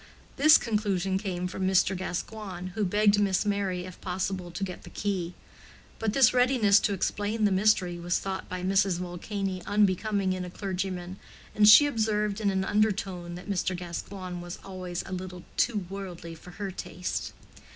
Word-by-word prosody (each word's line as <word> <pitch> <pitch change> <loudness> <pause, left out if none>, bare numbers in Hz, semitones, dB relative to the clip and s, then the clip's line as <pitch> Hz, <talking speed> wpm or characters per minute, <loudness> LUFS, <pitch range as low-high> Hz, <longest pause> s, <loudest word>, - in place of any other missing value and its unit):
This 310 +2 +7
conclusion 195 -4 0
came 180 -3 -3
from 185 +1 -2
Mr. 190 0 +3
Gascoigne, 185 0 -5
who 210 +3 -2
begged 205 +2 +3
Miss 195 -1 +2
Merry 195 -3 -1
if 185 -1 -11
possible 185 -1 -3
to 175 +3 -5
get 185 -2 -5
the - - -12
key. 185 -4 -3 0.6
But 220 -2 -1
this 260 -1 +5
readiness 245 -5 +5
to 205 - 0
explain 210 +3 -1
the 205 - +3
mystery 190 -3 +2
was 175 0 0
thought 190 -1 -4
by 180 0 -4
Mrs. 195 -1 +2
Vulcany 185 +2 -4
unbecoming 205 -1 +2
in 185 0 -3
a 180 - -6
clergyman, 185 -1 -4 0.4
and 210 0 +6
she 250 +8 +10
observed 215 -5 0
in 205 - +2
an 190 -1 0
undertone 190 -5 0
that 180 - -10
Mr. 185 -2 -1
Gascoigne 180 +1 -6
was 175 0 -7
always 185 -2 -5
a - - -9
little 180 -1 -6
too 210 -5 +1
worldly 180 -3 -7
for 165 +2 -13
her 195 +2 -5
taste. 180 0 -4
190 Hz, 170 wpm, -28 LUFS, 180-205 Hz, 0.6 s, she